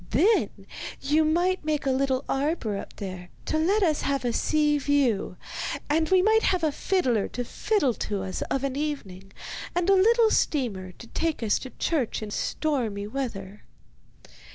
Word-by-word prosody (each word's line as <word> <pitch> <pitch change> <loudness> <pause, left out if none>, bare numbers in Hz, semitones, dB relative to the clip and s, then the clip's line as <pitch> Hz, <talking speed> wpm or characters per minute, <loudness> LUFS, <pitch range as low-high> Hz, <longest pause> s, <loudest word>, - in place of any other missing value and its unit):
Then 380 - +3 0.5
you 300 +3 +2
might 350 +4 +1
make 300 -1 -1
a 270 - +2
little 265 0 0
arbour 270 -6 -1
up 200 - -7
there 185 -3 -7 0.2
to 315 - 0
let 390 +6 +3
us 310 -4 +2
have 275 -2 -1
a 240 - +1
sea 300 +1 +2
view; 260 -10 +1 0.5
and 315 +1 +2
we 370 -1 +5
might 440 +2 +4
have 365 -5 +1
a 310 - +3
fiddler 270 - +1
to 245 - -4
fiddle 295 - +1 0.2
to 200 -2 -1
us 190 -1 -4
of 270 - -1
an 270 -1 -1
evening, 195 -11 -4 0.4
and 355 +2 +2
a - - +7
little 445 +4 +5
steamer 205 - 0
to 235 - -12
take 320 +2 -2
us 210 -2 +2
to 260 - -7
church 270 -9 -1
in 210 - -6
stormy 230 -8 -1
weather. 210 -5 -5
280 Hz, 170 wpm, -26 LUFS, 220-325 Hz, 0.5 s, a